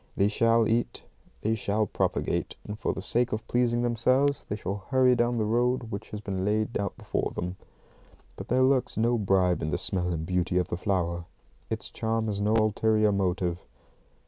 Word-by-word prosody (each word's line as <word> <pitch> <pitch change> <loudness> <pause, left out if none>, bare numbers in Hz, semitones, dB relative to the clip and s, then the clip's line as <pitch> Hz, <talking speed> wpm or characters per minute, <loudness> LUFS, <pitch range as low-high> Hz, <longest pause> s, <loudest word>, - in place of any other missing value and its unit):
They 100 +1 +3
shall 115 +1 +3
eat, 115 +2 -1 0.4
they 110 - +1
shall 105 0 0
propagate, - - -1
and 105 +1 -6
for - - 0
the 95 - -6
sake 120 +4 +1
of 110 0 -3
pleasing 120 -1 +1
themselves 130 +4 +2
they 105 - -1
shall 100 -1 -4
hurry 130 -1 +4
down 120 0 +1
the 110 - +1
road 120 +1 0
which 100 - -6
has 105 - -5
been 95 -3 -3
laid 105 +3 0
out 100 -2 -2
for - - -1
them. 90 +1 -3 0.8
But - - -8
there 130 +2 +3
lurks 130 -1 +2
no 120 +1 +2
bribe 95 -3 +2
in 75 - -1
the 75 - 0
smell 90 -2 -1
and 80 -2 -2
beauty 90 0 0
of 90 - 0
the - - -1
flower. 85 -3 -1 0.4
It's - - -3
charm 110 0 -1
has 100 -2 -2
no 105 +2 +2
ulterior 110 0 +3
motive. 90 -3 -1
110 Hz, 190 wpm, -27 LUFS, 95-120 Hz, 0.8 s, hurry